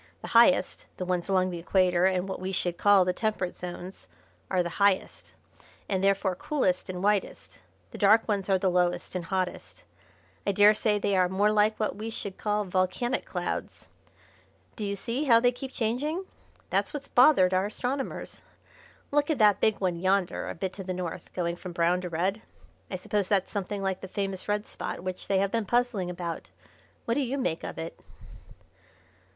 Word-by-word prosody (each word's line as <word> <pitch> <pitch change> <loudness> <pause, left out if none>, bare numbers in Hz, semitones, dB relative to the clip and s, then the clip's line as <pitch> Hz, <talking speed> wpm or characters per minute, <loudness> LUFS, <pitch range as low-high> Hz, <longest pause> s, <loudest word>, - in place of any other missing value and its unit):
The - - -6
highest 230 -6 +4
the 185 - -3
ones 180 0 -1
along 185 -1 +2
the 175 - -5
Equator 180 0 +3
and 185 0 0
what 190 - -4
we 185 +1 -3
should 175 -2 -1
call 200 -2 +5
the 180 - +1
Temperate 210 -3 -2
Zones 180 - -8 0.4
are 185 -2 +2
the 170 -1 -6
highest, 200 -2 +1 0.5
and 190 -1 -1
therefore 195 -1 +2
coolest 185 -4 -1
and 180 0 -4
whitest. 205 -1 -1 0.3
The - - -9
dark 215 +2 +5
ones 200 -3 -1
are 190 - +4
the 185 0 +1
lowest 175 0 0
and 180 -2 -3
hottest. 185 0 -3 0.6
I 200 - +2
daresay 210 +1 +4
they 200 -1 0
are 185 -1 +3
more 200 +3 +2
like 215 +1 +2
what 215 - -1
we 215 +3 -5
should 200 -3 -6
call 210 -1 0
volcanic 185 +7 0
clouds. - - -5 0.9
Do 215 - -5
you 200 - -2
see 235 +8 -3
how 230 -4 +6
they 245 +1 +3
keep 260 +2 -7
changing? 275 - -1 0.5
That's - - 0
what's 280 -1 -6
bothered 245 -9 +5
our 185 +2 +2
astronomers. 260 +5 -4 0.7
Look 290 +1 +2
at 310 - +1
that 205 -2 +4
big 220 -2 +2
one 180 -3 0
yonder 190 0 0
a - - -5
bit 185 +2 -3
to 195 - -7
the 185 -1 -4
north, 180 -2 -6
going 170 -1 -1
from 180 0 -8
brown 175 +1 +2
to 180 - -5
red. 185 +6 -1 0.5
I - - -4
suppose 195 +1 -1
that's 195 -2 +1
something 200 0 -3
like 190 -1 -1
the 190 - -6
famous 195 -1 -4
red 210 0 0
spot - - -6
which 185 -1 -5
they 195 - +2
have 195 0 +1
been 230 -2 0
puzzling 240 -6 +1
about. 175 -2 -5 0.6
What 230 - +1
do 285 - +1
you 270 +1 -2
make 170 -11 -2
of - - -6
it?" 165 +1 -6
195 Hz, 190 wpm, -28 LUFS, 180-215 Hz, 0.9 s, how